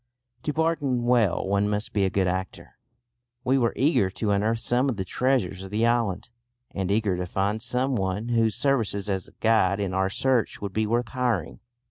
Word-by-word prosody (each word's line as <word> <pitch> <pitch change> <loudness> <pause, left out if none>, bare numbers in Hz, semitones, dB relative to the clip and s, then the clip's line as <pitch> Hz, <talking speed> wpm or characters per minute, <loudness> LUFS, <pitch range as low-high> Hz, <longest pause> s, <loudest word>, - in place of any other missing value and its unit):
To 150 - -2
bargain 150 -6 0
well 120 -8 +2
one 100 +1 +1
must 105 +1 -2
be 100 -2 +2
a - - +1
good 95 -1 +1
actor. 95 +1 -5 0.6
We 135 +1 +2
were 115 -2 +2
eager 135 - +2
to 105 +2 -2
unearth 105 +3 +1
some 125 +4 +1
of 120 - -2
the 95 - -3
treasures 110 -4 0
of 95 - -8
the 110 +3 +1
island, 115 -4 0 0.4
and 95 -2 -3
eager 105 -2 +1
to 90 0 -3
find 100 +4 -1
some 130 +3 0
one 100 +2 -2
whose 115 -3 +2
services 115 -6 0
as 95 -1 -3
guide 110 -3 +3
in 100 -2 -2
our 95 0 +1
search 125 +3 0
would 100 -2 -5
be 110 +1 0
worth 120 +2 0
hiring. 120 -10 -1
110 Hz, 190 wpm, -25 LUFS, 95-120 Hz, 0.6 s, guide